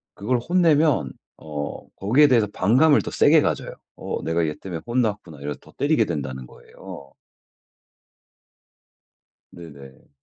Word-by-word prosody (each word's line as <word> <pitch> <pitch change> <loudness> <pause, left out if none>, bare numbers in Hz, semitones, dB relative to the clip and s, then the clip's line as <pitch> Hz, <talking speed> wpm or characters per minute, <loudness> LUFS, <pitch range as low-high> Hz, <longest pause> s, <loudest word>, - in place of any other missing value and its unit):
그걸 120 +4 -1
혼내면 155 - +2 0.3
어 75 -2 -7
거기에 130 +10 +4
대해서 115 -6 +3
반감을 130 +10 +4
더 - - -7
세게 - - +4
가져요. - - -2 0.2
어 - - -5
내가 80 +1 0
얘 75 - -3
때문에 90 -4 -7
혼났구나 105 - -2
이래서 70 -1 -5
더 - - -19
때리게 145 -6 +2
된다는 65 -6 -5
거예요. 70 +2 -13 2.4
네네. 70 -6 -14
95 Hz, 275 characters per minute, -22 LUFS, -, 2.4 s, 거기에